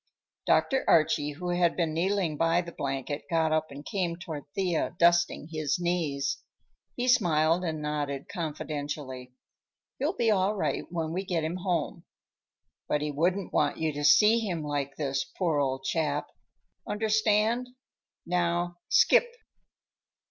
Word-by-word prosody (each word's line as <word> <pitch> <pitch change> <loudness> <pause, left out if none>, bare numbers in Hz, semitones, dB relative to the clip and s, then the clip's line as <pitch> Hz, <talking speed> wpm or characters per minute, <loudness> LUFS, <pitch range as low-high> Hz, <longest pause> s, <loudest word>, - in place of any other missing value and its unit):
Dr. 265 -1 +3
Archie, 150 -2 +3
who 175 +4 -5
had 175 -1 +2
been 165 -3 0
kneeling 180 -1 0
by 165 +3 +2
the 170 -1 -8
blanket, 135 0 -3
got 160 -2 +2
up 155 0 +1
and 140 +1 -10
came 180 -4 -1
toward 165 -4 -7
Thea, 180 -5 0
dusting 170 -2 +3
his 155 -3 -1
knees. 165 -6 -1 0.6
He 245 +1 -2
smiled 170 - +3
and 160 -3 -3
nodded 145 -2 -3
confidentially. 145 -6 -5 0.7
"He'll 300 +8 0
be 230 -2 +3
all 200 +1 +2
right 200 - -1
when 165 -2 -3
we 185 +2 -2
get 175 -4 -1
him 165 +3 -2
home. 180 -4 -2 0.8
But 150 - 0
he 150 - -2
wouldn't 175 +6 0
want 145 - +1
you 160 -1 -1
to 145 +1 -4
see 210 +10 +6
him 180 -8 -3
like 145 -2 -3
this, 140 -2 -1
poor 165 -6 +1
old 135 -1 -1
chap! 150 +1 -1 0.6
Understand? 220 +3 +1 0.6
Now, 175 0 0
skip!" 480 - +5
165 Hz, 140 wpm, -28 LUFS, 150-185 Hz, 0.8 s, see